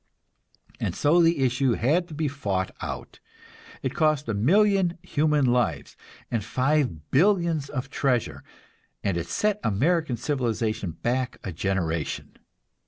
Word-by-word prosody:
And - - -2
so 165 +4 +4
the 165 -4 +3
issue 125 0 +2
had 155 +11 +1
to 155 - -9
be 155 0 0
fought 100 -10 -2
out. - - -6 0.6
It 130 - -1
cost 155 -2 +1
a 115 - -1
million 185 - +3
human 150 -1 +2
lives 120 - 0 0.4
and 115 -3 0
five 130 - 0
billions 170 -3 +2
of 135 -1 -4
treasure, 125 -6 0 0.6
and 95 - 0
it 85 - -3
set 210 -1 0
American 140 - +1
civilization 115 - -1
back 125 +5 -2
a 95 - -4
generation. 85 -3 -2
130 Hz, 130 wpm, -26 LUFS, 110-155 Hz, 0.6 s, so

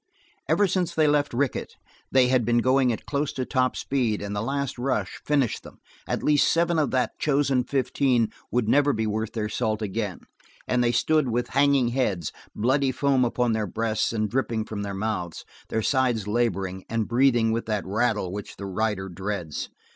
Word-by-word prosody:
Ever 205 - +4
since 180 -2 -1
they 155 - +4
left 145 -1 +2
Rickett 130 +2 -2 0.4
they 130 -1 +5
had 125 -1 +3
been 120 +1 +2
going 130 +1 +3
at 115 - -5
close 145 0 -1
to 130 - -3
top 130 -1 +1
speed 120 -6 0
and 100 0 -4
the 100 - -1
last 135 +2 -2
rush 130 +2 -2
finished 140 -6 +1
them; - - -13 0.3
at - - -2
least 150 -1 +4
seven 170 0 +2
of 145 -4 +1
that 130 -1 -1
chosen 140 -3 +2
fifteen 125 -2 +1 0.2
would 120 -3 0
never 145 +4 +4
be 110 0 -1
worth 110 0 -2
their 110 -2 -2
salt 110 0 -1
again, 105 -2 -3 0.5
and 125 -1 +2
they 120 - +3
stood 150 +3 +2
with 120 +1 -1
hanging 140 -2 +3
heads, 105 - -1 0.2
bloody 130 +4 +2
foam 135 -1 +2
upon 120 -1 +1
their 110 -1 -1
breasts 110 +3 -1
and 110 -2 -1
dripping 115 -4 -1
from 105 -2 -5
their 100 -1 -4
mouths, 95 -5 -3 0.2
their 110 - -1
sides 125 -6 +1
laboring, 95 -5 -1
and 115 -1 -1
breathing 120 -2 +3
with 115 0 -2
that 105 -3 -1
rattle 105 -2 0
which 100 +1 -7
the 100 - -6
rider 100 0 -1
dreads. 95 -3 -4
120 Hz, 185 wpm, -25 LUFS, 105-135 Hz, 0.5 s, they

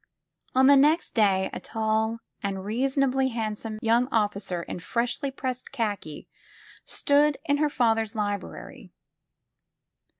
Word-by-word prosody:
On 260 +1 +5
the 280 +1 +8
next 300 +5 +3
day 195 -4 +2
a - - -4
tall 220 0 -1 0.2
and 195 -1 -3
reasonably 265 +3 +1
handsome 220 -2 -4
young 235 +2 +3
officer 200 -5 -1
in - - -6
freshly 235 +8 -2
pressed 260 -2 -5
khaki 205 - -4 0.6
stood 290 0 +2
in 285 0 +2
her 300 0 +2
father's 225 -5 +1
library. 205 -2 -5
225 Hz, 120 wpm, -26 LUFS, 210-265 Hz, 0.6 s, the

